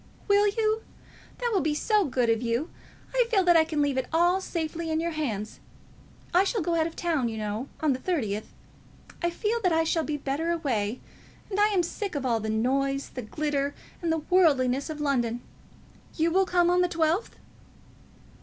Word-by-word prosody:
"Will 405 0 +5
you? 435 +1 +1 0.6
That 485 -1 -1
will 390 - +3
be 300 0 0
so 420 +4 +2
good 250 -4 0
of 225 0 +2
you. 240 +6 -1 0.4
I - - +3
feel 405 -5 +3
that 350 -1 +5
I 325 - +7
can 310 -2 0
leave 280 -2 +1
it 255 - -3
all 350 +3 +3
so - - -8
safely 330 0 -3
in 315 0 0
your 335 +1 -1
hands. 230 -10 -3 0.7
I 360 +2 +6
shall 400 -1 -1
go 340 - 0
out 325 -1 +2
of 330 - -9
town, 320 -8 0
you 220 - -5
know, 215 +4 -3
on 305 -3 +3
the 255 - -4
thirtieth. 220 - -2 0.7
I 345 - +2
feel 430 +7 -1
that 365 -4 +2
I 325 0 +3
shall 325 0 +1
be 300 -1 -2
better 285 +4 -2
away, 255 -9 -1 0.5
and 395 - -1
I 415 - +6
am 390 -4 +2
sick 390 +2 -4
of 280 -2 -2
all 235 -3 +2
the 220 0 -4
noise, 275 +5 0
and 245 -4 -6
glitter, 285 -2 -1 0.3
and 335 -2 0 0.2
worldliness 280 -7 +3
of 305 -1 -5
London. 240 -5 0 0.7
You 330 +1 +1
will 380 +2 +3
come 350 -1 +3
on 360 0 +3
the 360 - +3
twelfth?" 335 +4 0
315 Hz, 200 wpm, -27 LUFS, 260-355 Hz, 0.7 s, I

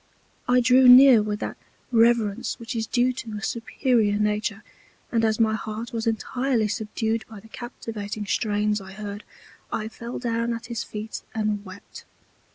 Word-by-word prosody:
I 250 0 +4
drew 255 +1 +5
near 250 -2 +9
with 210 0 -3
that - - -4 0.3
Reverence 230 -3 +2
which 230 0 -6
is 225 -1 -2
due 250 +2 +2
to 230 -3 -7
a 210 - -8
superior 230 -3 +1
Nature; 210 0 -1 0.5
and 230 -1 +1
as 220 0 +1
my 220 -1 +3
heart 220 +2 -5
was 230 0 -2
entirely 230 +1 0
subdued 220 +1 -2
by 220 -2 -10
the 215 - -16
captivating 220 -3 -6
Strains 210 0 0
I 190 0 -11
heard, 205 0 -7 0.5
I 215 - -2
fell 235 +2 -7
down 235 -1 -1
at 230 0 -8
his 230 - -2
Feet 215 +1 -6
and 210 -2 -1
wept. 185 0 -12
225 Hz, 165 wpm, -24 LUFS, 210-235 Hz, 0.5 s, near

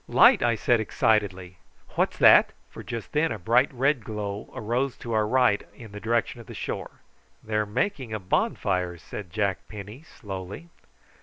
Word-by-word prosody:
"Light!" - - +6
I 120 -1 +2
said 120 +1 +2
excitedly. 100 -5 0 0.3
"What's - - -1
that?" - - +7 0.2
for - - -9
just 115 -3 -6
then 160 +2 +1
a - - -3
bright 115 +8 +2
red 135 -1 +1
glow 105 -1 -5
arose 120 +4 -1
to 115 - -6
our 110 -1 +2
right 125 -3 +3
in 115 -4 -12
the 105 - -8
direction 115 +2 -1
of 115 - -16
the - - -9
shore. - - -6 0.4
"They're 105 -1 0
a 105 - -3
making 130 - -2
a 110 - -1
bonfire," 90 -2 -1
said 90 +4 -8
Jack 100 -2 -1
Penny 105 +5 -9
slowly. 100 - -8
110 Hz, 170 wpm, -26 LUFS, 100-120 Hz, 0.4 s, that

